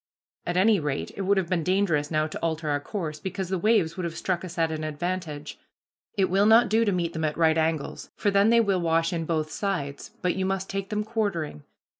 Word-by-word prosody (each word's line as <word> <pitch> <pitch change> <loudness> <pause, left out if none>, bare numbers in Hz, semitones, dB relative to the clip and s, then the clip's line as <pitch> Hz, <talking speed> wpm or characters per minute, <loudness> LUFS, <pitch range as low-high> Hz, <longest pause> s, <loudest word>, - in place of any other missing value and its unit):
At 175 +1 0
any 205 +2 +5
rate 145 -2 -3
it - - -4
would 195 +1 +2
have 190 -3 +1
been 175 -3 +1
dangerous 180 -6 +1
now 155 -1 +1
to 155 - -6
alter 160 -1 -2
our 145 0 +1
course, 155 -1 -5
because 190 -1 -4
the 190 -1 -1
waves 200 -5 +2
would 185 - -3
have 170 -1 -4
struck 185 -2 -1
us 180 -1 -8
at 165 -1 +1
an 155 0 -3
advantage. 155 -1 -4 0.6
It 190 -1 +3
will 195 +3 +3
not 225 +1 +6
do 220 +2 +3
to 210 - +2
meet 170 -2 -1
them 160 - -3
at 150 -1 -1
right 160 -1 +4
angles, 160 -2 -1
for 205 - +1
then 200 +2 +4
they 235 0 +6
will 195 -4 +1
wash 165 0 +1
in 165 -1 -2
both 155 -2 -1
sides, 145 -9 -3
but 180 - +1
you 190 - -1
must 195 0 -2
take 195 0 -3
them 210 0 -1
quartering. 200 - -2
175 Hz, 235 wpm, -26 LUFS, 160-195 Hz, 0.6 s, not